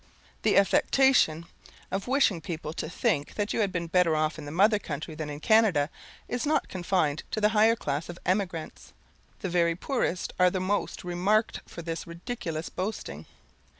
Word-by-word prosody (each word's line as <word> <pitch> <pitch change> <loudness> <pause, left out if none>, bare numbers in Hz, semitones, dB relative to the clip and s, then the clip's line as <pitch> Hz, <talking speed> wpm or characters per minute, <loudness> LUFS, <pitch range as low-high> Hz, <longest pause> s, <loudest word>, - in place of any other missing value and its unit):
The - - +3
affectation 200 - +4 0.5
of 195 +3 -3
wishing 250 - +2
people 160 -2 -5
to 155 - -4
think 175 - -1
that 205 0 -1
you - - -1
had 205 -3 +1
been 180 -2 -2
better 170 -1 +3
off 155 +1 0
in 150 - -8
the 145 - -6
mother 205 +6 +4
country 155 -2 -5
than 155 -1 -5
in 145 0 -6
Canada, 180 -7 +3 0.4
is 245 0 -2
not 305 +1 +1
confined 175 -5 0
to - - -2
the 210 0 +4
higher 220 +1 +4
class 145 -5 -3
of 175 - -7
emigrants. 185 -4 -2 0.5
The 190 - -2
very 170 -1 +2
poorest 185 - -2
are 180 0 +6
the 185 - -2
most 185 -3 -2
remarked 190 +5 +1
for 170 - -9
this 165 0 -5
ridiculous 170 -2 -5
boasting. 200 +4 -5
180 Hz, 175 wpm, -28 LUFS, 165-210 Hz, 0.5 s, are